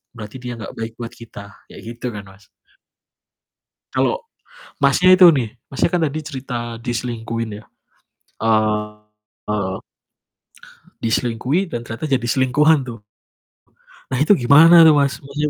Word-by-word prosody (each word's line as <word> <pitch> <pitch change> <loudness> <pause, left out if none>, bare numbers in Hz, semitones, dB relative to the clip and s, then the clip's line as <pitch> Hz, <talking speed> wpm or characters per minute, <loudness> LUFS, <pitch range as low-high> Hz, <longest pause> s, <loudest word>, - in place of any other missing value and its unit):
berarti 105 +3 -9
dia 125 0 -5
nggak - - -7
baik 115 0 -5
buat 115 -1 -6
kita, 115 -3 -11 0.3
kayak - - -12
gitu 120 +1 -8
kan, 105 - -7
Mas. 95 +2 -19 1.5
Kalau 485 +1 0 0.6
Masnya 185 0 +5
itu 180 -2 +8
nih, 125 -6 -2 0.2
Masnya 135 +5 0
kan 175 - +1
tadi 155 0 -2
cerita 125 -5 -6
diselingkuhin 115 -2 -4
ya, - - -25 0.8
eee 105 -2 -2 1.2
diselingkuhin 125 - -1
dan 120 - -3
ternyata 115 +4 -6
jadi 135 -5 -1
selingkuhan 140 +3 +2
tuh. 115 -4 -9 1.1
Nah, 130 - -1
itu 155 +8 +4
gimana 165 +6 +7
tuh, 160 -1 +7
Mas? 140 -1 +1
Maksudnya 145 +2 -3
120 Hz, 130 wpm, -19 LUFS, 110-145 Hz, 1.5 s, itu